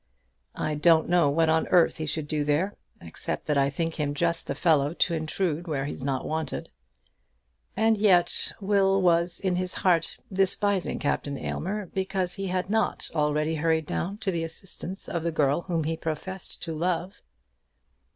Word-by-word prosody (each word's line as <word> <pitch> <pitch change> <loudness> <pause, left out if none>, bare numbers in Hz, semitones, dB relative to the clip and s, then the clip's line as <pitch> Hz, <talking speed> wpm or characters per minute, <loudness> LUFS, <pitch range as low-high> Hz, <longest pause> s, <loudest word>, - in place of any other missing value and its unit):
"I 155 - -2
don't 160 +2 +4
know 175 -4 +4
what 160 +3 +2
on 160 0 +2
earth 175 -2 +4
he 155 -1 -4
should 150 0 -2
do 150 -1 0
there, 150 +8 +1 0.3
except 80 - -4
that 150 - 0
I 140 0 +3
think 165 +3 -3
him 145 -1 -1
just 170 +1 0
the - - -2
fellow 155 -2 +2
to 175 - +2
intrude 165 +1 -2
where 140 -4 -1
he 145 - -3
is - - -7
not 135 -1 -1
wanted." 160 0 -4 1.1
And 220 0 +3
yet 185 -5 +4
Will 195 -1 +2
was 170 -1 +3
in 185 -2 0
his 185 0 -1
heart 170 -3 +1 0.2
despising 195 0 +1
Captain 140 -1 -2
Aylmer 205 +8 -3
because 190 0 -2
he 195 -1 -2
had 180 0 -1
not 220 +1 0
already 150 0 +1
hurried 160 0 +1
down 190 +6 -3
to 190 - +2
the 165 -2 -2
assistance 180 +3 -4
of 170 - -2
the 170 +1 -1
girl 145 0 +1
whom 170 -3 -2
he 160 +2 -1
professed 165 +4 -5
to 165 - -3
love. 175 +4 -2
170 Hz, 175 wpm, -26 LUFS, 155-185 Hz, 1.1 s, don't